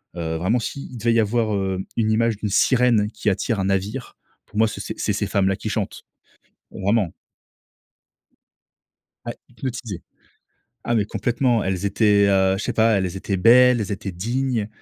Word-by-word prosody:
Heu, 80 -2 -3
vraiment 95 +8 +1
s'il 125 +1 -6
devait 115 +1 +1
y 115 - +3
avoir, 110 0 +1
heu, 95 -2 -1 0.2
une 110 -2 +1
image 115 -1 +1
d'une 105 -1 -3
sirène 115 -1 +3
qui 110 - -1
attire 105 +2 -1
un 95 - 0
navire, 100 +6 -2 0.3
pour - - -11
moi, 110 +1 +4
c'est - - -6
ces - - -6
c'est - - -1
ces - - -2
femmes 95 -1 +1
là 95 - +1
qui - - -5
chantent, - - -4 0.7
vraiment. 100 -2 0 2.1
Ouais, - - -4 0.2
hypnotisé. 120 -7 -6 0.8
Ah, 120 - 0
mais 110 -3 +2
complètement, 120 +1 0
elles 95 0 -2
étaient, 100 0 +3
heu, 95 -1 +3
je - - -4
sais - - -1
pas, 115 0 +3
elles 95 -2 -1
étaient 95 0 -2
belles, 125 +4 +6
elles 105 -1 -3
étaient 95 -1 -5
dignes. 120 +3 -2
105 Hz, 175 wpm, -22 LUFS, 95-115 Hz, 2.1 s, belles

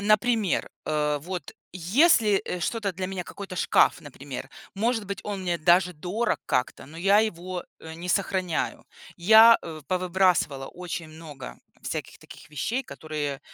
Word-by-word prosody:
Например, 215 -1 +2 0.2
э, 150 -1 0
вот 180 -1 -6 0.2
если, 210 - +4
э, 180 - -4
что-то 205 +2 -1
для 185 +1 -4
меня, 185 -2 -5
какой-то 195 -2 -8
шкаф, - - +3
например, 140 -1 -8 0.3
может 225 +2 0
быть, 200 -1 -4
он 200 -2 -4
мне 175 -2 -1
даже 175 +3 +4
дорог 185 +9 -2
как-то, 125 - -1
но 160 +3 -13
я 195 +4 +4
его, 185 -4 -2 0.2
э, 160 0 -9
не 175 +2 -7
сохраняю. 185 -3 -1 0.3
Я, 220 +5 +8
э, 160 -2 -8
повыбрасывала 180 -6 +1
очень 175 -2 -6
много 155 -4 -10 0.2
всяких - - -5
таких - - -14
вещей, 230 - -2
которые, 145 - -5
180 Hz, 145 wpm, -26 LUFS, 160-200 Hz, 0.3 s, Я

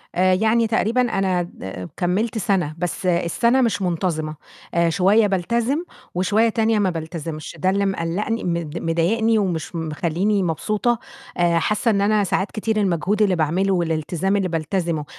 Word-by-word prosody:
آآ 185 +1 +3
يعني 220 +4 +2
تقريبًا 225 +2 +1
أنا 195 -6 +1
د 95 - -7
كمّلت 195 +6 0
سنة، 180 -7 0
بس 180 +2 -3
السنة 180 +9 +2
مش 215 -5 +1
منتظمة، 165 -3 -1 0.4
آآ 170 0 +3
شوية 200 +5 +4
بالتزم 235 - 0 0.3
وشوية 205 +5 +2
تانية 225 0 +1
ما 195 -2 +2
بالتزمش، 160 -1 -6
ده 185 - +2
اللي 200 +1 +1
مقلّقني 195 +4 -2
مض 170 -2 -2
مضايقني 205 +8 +1
ومش 175 -4 -2
مخلّيني 170 +5 0
مبسوطة، 215 +8 0 0.4
آآ 170 -1 +3
حاسّة 215 +6 +1
إن 200 -2 +1
أنا 210 +1 +3
ساعات 195 +1 -1
كتير 220 0 -2
المجهود 195 +1 +1
اللي 195 -3 +3
باعمله 175 +5 +1
والالتزام 170 +2 0
اللي 195 -2 +1
بالتزمه 165 -1 -2
185 Hz, 150 wpm, -21 LUFS, 170-215 Hz, 0.4 s, شوية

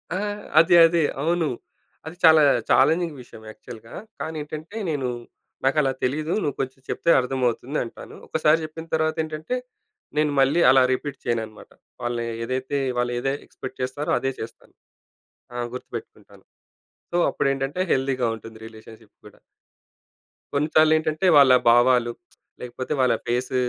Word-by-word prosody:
ఆ! - - -1 0.4
అదే 165 +2 +5
అదే. 165 -1 +1 0.2
అవును. 165 +1 +1 0.6
అది 160 +2 -8
చాలా 160 -1 +7 0.3
ఛాలెంజింగ్ 160 +3 +3
విషయం 120 - -14
యాక్చువల్‌గా. 115 +1 -12 0.3
కానీ, 160 0 -5
ఏంటంటే 155 +7 -8
నేను, 140 -5 -2 0.6
"నాకు 135 +3 +2
అలా 135 -2 +1
తెలీదు 150 +5 -1
నువ్వు 145 - -2
కొంచెం 130 0 -6
చెప్తే - - -1
అర్థమవుతుంది" 125 +2 -1
అంటాను. 115 - -11
ఒకసారి 155 0 +2
చెప్పిన 160 +1 -9
తర్వాత 160 0 0
ఏంటంటే 155 +8 -4 0.6
నేను 150 -1 +2
మళ్ళీ 140 +5 +3
అలా 130 0 +6
రిపీట్ 140 +1 -4
చేయను 115 -1 0
అనమాట. 110 -1 -15 0.3
వాళ్ళ 120 0 -2 0.3
ఏదైతే 130 +3 -2 0.2
వాళ్ళ 120 0 0
ఏది 135 +2 -1
ఎక్స్పెక్ట్ 130 0 -10
చేస్తారో 130 +4 -3
అదే 135 - -1
చేస్తాను. 110 - -10 0.8
ఆ! - - -4 0.2
గుర్తుపెట్టుకుంటాను. 125 - -10 0.7
సో, - - +2
అప్పుడు - - -1
ఏంటంటే 135 +5 -4
హెల్తీగా 130 -2 0
ఉంటుంది 110 0 -12
రిలేషన్షిప్ 110 -1 -15
కూడా. 105 - -18 1.2
కొన్నిసార్లేంటంటే 155 +3 +2
వాళ్ళ 135 -2 +7 0.2
భావాలు 120 0 +4 0.5
లేకపోతే 125 +3 -6
వాళ్ళ 125 -2 +3
ఫేస్ 125 +2 -2
135 Hz, 135 wpm, -23 LUFS, 125-155 Hz, 1.2 s, చాలా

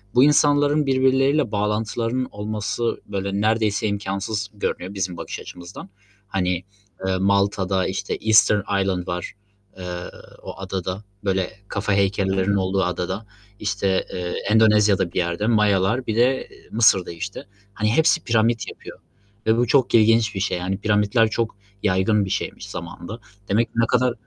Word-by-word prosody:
bu 125 - +7
insanların 145 0 +4
birbirleriyle 135 0 +2
bağlantılarının 110 +4 -1
olması, 105 +3 -3
böyle, 100 0 -3
neredeyse 110 -1 +1
imkânsız 100 +1 -3
görünüyor 100 -1 -3
bizim 90 -3 -3
bakış - - -6
açımızdan. 90 +2 -10 0.4
Hani, 90 -2 -1 0.4
eee, 95 0 +1
Malta'da 100 -1 +1
işte 95 - -3
Easter 105 -2 +4 0.2
Island 90 -2 -1
var, 90 0 -4 0.4
eee, 90 - -8 0.6
o - - -8
adada, 95 +1 -4 0.2
böyle 95 -2 0 0.2
kafa 100 0 -1
heykellerinin 95 0 +1
olduğu 95 0 +1
adada, 90 +4 -3 0.3
işte, 100 -2 0
eee, 90 -1 -3 0.2
Endonezya'da 105 -4 +4
bir - - -7
yerde, 85 +4 0
Mayalar, 105 +2 +2
bir 110 - -1
de 130 +3 +2 0.2
Mısır'da, 110 -6 +3
işte. 90 +4 -6 0.3
Hani, 105 0 0
hepsi 160 +4 +3
piramit 115 0 +1
yapıyor - - -11 0.5
ve 110 +1 +4
bu 120 -1 +2
çok 130 -2 +3
ilginç 110 -1 +4
bir - - -2
şey, 95 -2 0
yani, 95 +2 -2
piramitler 105 +2 +2
çok 110 -1 -2 0.3
yaygın 100 +1 +2
bir 95 - -6
şeymiş - - -4
zamanında. 105 +7 -7 0.3
Demek 115 +3 +2
ne 115 0 +3
kadar 125 -1 +2
105 Hz, 140 wpm, -22 LUFS, 95-115 Hz, 0.6 s, bu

